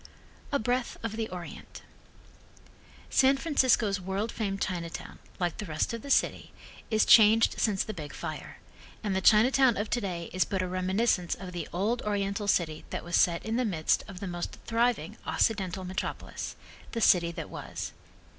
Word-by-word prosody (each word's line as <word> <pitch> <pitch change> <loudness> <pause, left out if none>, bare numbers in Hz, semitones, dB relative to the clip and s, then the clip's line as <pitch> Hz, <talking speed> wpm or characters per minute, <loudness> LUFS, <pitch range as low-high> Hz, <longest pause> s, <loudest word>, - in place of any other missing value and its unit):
A 280 - +3
Breath 245 +1 -1
of 225 -1 -3
the 225 -1 -3
Orient 175 -2 -9 1.3
San 270 +1 +5
Francisco's 255 - +2
world 195 +5 -2
famed 200 -3 -3
Chinatown, 170 -4 -4 0.2
like 175 -2 -1
the 210 - -3
rest 155 +7 -1
of 230 - -4
the 280 - -9
city, - - +1 0.4
is 220 -1 +3
changed 220 0 +6
since 205 -4 +2
the 215 - -5
big 150 -6 -7
fire, 155 -1 -7 0.5
and 200 -3 -1
the 190 - +1
Chinatown 245 +5 +5
of 210 +1 -3
today 185 -8 -2
is 185 -1 +3
but 190 +3 -2
a - - -2
reminiscence 185 0 +1
of 185 0 -8
the 175 -3 -5
old 210 +7 0
Oriental 200 0 -1
city 160 -5 +1
that - - -4
was 175 0 -2
set 170 -1 +3
in 220 +1 -1
the 255 - +2
midst 170 -9 +1
of 195 -2 -9
the - - -3
most 175 -1 -5
thriving 230 -4 0
Occidental 190 -4 0
metropolis 185 +1 -5 0.4
The 230 - -2
City 170 -4 +5
That - - -7
Was. - - -6
200 Hz, 170 wpm, -29 LUFS, 180-225 Hz, 1.3 s, changed